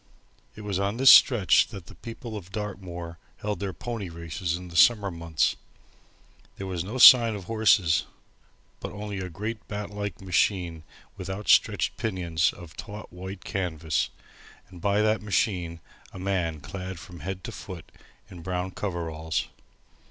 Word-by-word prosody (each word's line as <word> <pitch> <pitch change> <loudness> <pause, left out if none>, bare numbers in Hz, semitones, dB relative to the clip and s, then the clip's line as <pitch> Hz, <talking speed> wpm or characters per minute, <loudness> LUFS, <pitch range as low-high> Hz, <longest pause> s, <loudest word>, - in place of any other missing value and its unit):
It 105 - -9
was 100 -3 -2
on 100 +3 -1
this 135 +1 +9
stretch 110 - +6
that 95 -4 -9
the - - -13
people 115 -1 -8
of 95 -3 -8
Dartmoor 90 -5 -6 0.2
held 105 -3 -3
their 100 -1 -2
pony 100 +3 -5
races 85 +1 -3
in 90 0 -8
the 85 - -11
summer 100 +1 +5
months. 85 -2 0 1.0
There 100 - -5
was 90 -3 -3
no 105 +7 -5
sign 120 -3 +9
of 100 - -7
horses; 100 -5 +3 0.7
but - - -6
only 105 -1 -5
a 95 -1 -4
great 105 +6 -5
bat 105 0 -5
like 100 -3 -5
machine 90 -3 0 0.4
with - - -7
out 100 +2 -5
stretched - - +3
pinions 85 -6 0
of 85 -2 -12
taut 105 -1 -9
white 95 +1 -8
canvas, 85 -6 -1 0.6
and 90 -3 -13
by 100 +2 +2
that 110 0 +2
machine 90 -5 -1 0.3
a - - -10
man 90 -5 -1
clad 95 +5 -6
from 85 +1 -11
head 95 +4 -5
to - - -6
foot 90 -4 -9 0.4
in 90 - -11
brown 90 +2 -3
overalls. 80 -5 -2
95 Hz, 160 wpm, -27 LUFS, 85-105 Hz, 1.0 s, this